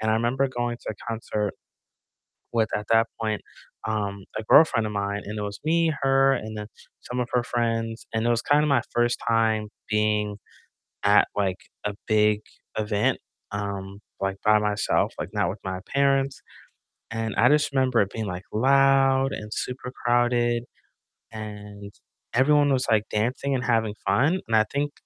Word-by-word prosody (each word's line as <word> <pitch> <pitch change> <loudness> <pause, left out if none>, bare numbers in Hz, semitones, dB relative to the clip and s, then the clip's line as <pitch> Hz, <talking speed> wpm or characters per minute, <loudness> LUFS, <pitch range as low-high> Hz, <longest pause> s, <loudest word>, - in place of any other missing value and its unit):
and 110 0 0
I 110 - +3
remember 120 +4 +1
going 120 -1 -2
to - - -6
a - - -14
concert 110 -2 -2 1.0
with, 115 -2 +2
at 105 - -5
that 115 0 +4
point, 110 -2 -1 0.4
um, 100 -2 -2
a 110 - -5
girlfriend 115 -3 +5
of 105 - -4
mine, 100 0 -2
and 105 +1 -5
it 105 - -2
was 100 0 -5
me, 165 0 +2
her, 135 0 +4
and 110 0 -5
then 105 0 -6 0.3
some 125 0 -4
of 120 - -2
her 125 -1 +2
friends, 115 -2 -2
and 115 +1 0
it - - +3
was 120 0 +2
kinda 150 +1 +3
my 140 -5 +3
1st 120 0 +1
time 110 -2 +2 0.2
being 105 -1 0 0.7
at, - - +5
like, 95 -2 0 0.3
a 105 - -2
big 105 -1 +3 0.4
event, 110 +4 +1 0.3
um, 100 -1 -5 0.2
like, 95 0 -2
by 105 0 +5
myself, 105 -1 +1
like, - - -3
not - - +1
with - - -7
my 95 -1 -3
parents, 135 -1 +2 0.7
and 115 -1 -3
I 120 - +5
just 150 0 +3
remember 130 -3 +2
it 100 - -3
being, 110 -2 -3
like, 90 0 -5
loud 135 +2 +4
and 105 0 -6
super 125 +1 -4
crowded, 120 -1 +2 0.7
and 105 -2 -8 0.4
everyone 145 +3 +4
was, 130 -1 +1
like, 110 -1 +2
dancing 125 +6 -1
and 125 - -1
having 110 -3 +1
fun, 140 - +2
and 115 - +1
I 110 - +6
think 145 +1 -1
115 Hz, 170 wpm, -25 LUFS, 105-130 Hz, 1.0 s, I